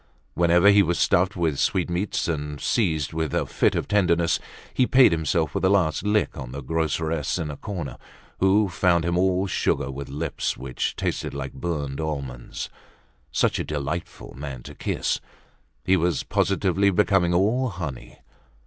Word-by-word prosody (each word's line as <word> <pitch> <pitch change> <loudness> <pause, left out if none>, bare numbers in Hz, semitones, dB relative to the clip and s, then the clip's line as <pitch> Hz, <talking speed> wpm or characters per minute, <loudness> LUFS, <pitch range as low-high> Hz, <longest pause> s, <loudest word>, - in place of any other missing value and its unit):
Whenever 85 +3 +5
he 100 0 +6
was 85 -2 +1
stuffed 95 +2 +2
with 80 -6 0
sweetmeats 90 +2 0
and 75 -3 -3
seized 80 - 0
with 80 -2 -2
a - - +1
fit - - +1
of - - -2
tenderness, 85 -5 +2 0.3
he 125 - +2
paid 130 -5 +6
himself 80 -1 0
with - - -2
a 95 - +4
last 90 -5 +2
lick 105 +1 +1
on 65 -4 -7
the 70 +1 -6
groceress 80 +1 -1
in 80 -4 -3
a - - -6
corner, 85 - -6 0.4
who 100 +2 +4
found 90 -2 +2
him 85 0 0
all 95 +1 +2
sugar 75 -7 0
with 70 +1 -7
lips 70 +2 -3
which 65 -1 -3
tasted - - -3
like 70 -1 -5
burnt 75 -5 -3
almonds. 70 -6 -4 0.6
Such - - +1
a - - 0
delightful 75 +3 -5
man 70 -3 -7
to - - -9
kiss! - - -1 0.7
He 95 - +4
was 85 -3 +1
positively 100 +1 +1
becoming 95 -3 +2
all 115 +8 +2
honey. 80 - -7
85 Hz, 160 wpm, -24 LUFS, 75-95 Hz, 0.7 s, he